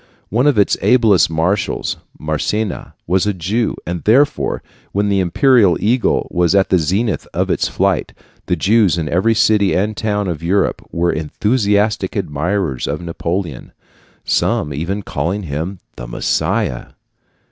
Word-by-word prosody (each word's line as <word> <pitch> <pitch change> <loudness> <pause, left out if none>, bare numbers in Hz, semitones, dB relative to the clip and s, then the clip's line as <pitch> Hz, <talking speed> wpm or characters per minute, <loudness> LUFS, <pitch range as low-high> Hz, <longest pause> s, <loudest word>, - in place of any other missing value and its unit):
One 120 +7 +2
of 145 -6 +3
its 100 - +3
ablest 110 -10 +4
marshals 85 +5 -1 0.2
Massena 90 +7 -3
was 95 +3 +1
a 105 - 0
Jew, 105 +7 -1
and 85 0 -4
therefore, 135 +7 +2 0.3
when 100 +1 +1
the 100 -1 +2
imperial 95 - +4
eagle 115 +4 +1
was 90 +1 +2
at 95 -1 +3
the 95 - +3
zenith 95 +7 -1
of - - 0
its - - +1
flight, - - 0 0.4
the 90 - +1
Jews 100 +1 +3
in 80 -2 -2
every 95 +8 +2
city 105 -2 +3
and 105 +3 0
town 105 -2 -1
of 80 -4 -3
Europe 95 +4 0
were 85 +1 +1
enthusiastic 105 +4 0
admirers 85 -3 -2
of 75 +2 -2
Napoleon, 85 -2 -4 0.5
some 75 - 0
even 90 +8 -3
calling 100 +4 -2
him 80 +5 -4 0.2
the - - -7
Messiah. - - -1
95 Hz, 145 wpm, -17 LUFS, 85-105 Hz, 0.5 s, ablest